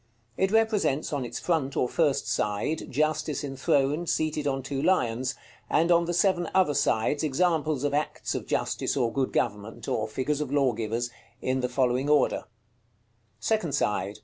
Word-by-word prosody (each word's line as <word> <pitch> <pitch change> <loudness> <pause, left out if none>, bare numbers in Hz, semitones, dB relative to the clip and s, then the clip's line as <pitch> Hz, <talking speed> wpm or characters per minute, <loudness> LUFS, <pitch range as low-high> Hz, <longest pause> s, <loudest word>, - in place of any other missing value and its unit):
It 190 - +1
represents, 210 - +1
on 140 -3 -1
its 120 - -5
front 150 -6 -1
or 125 - +2
first 145 0 +1
side, 105 +10 -1
Justice 155 +2 0
enthroned, 140 +3 0
seated 155 -2 0
on 135 -1 -1
two 135 0 -3
lions; 130 -7 +1 0.3
and 165 +3 +3
on 170 0 +4
the 175 - -2
seven 175 -2 +2
other 185 -6 +4
sides 145 0 +1
examples 155 -1 +1
of 145 -1 0
acts 150 +1 -1
of - - -4
justice - - -1
or 120 -4 +1
good 135 -1 0
government, 105 -1 -2
or 110 0 -1
figures 130 +7 -2
of 145 -3 -3
lawgivers, 120 -4 0 0.3
in 130 0 -1
the 125 -1 -1
following 125 +2 +1
order: 150 -2 +3 1.0
_Second 175 - 0
side. 105 -5 -1
140 Hz, 160 wpm, -27 LUFS, 125-155 Hz, 1.0 s, on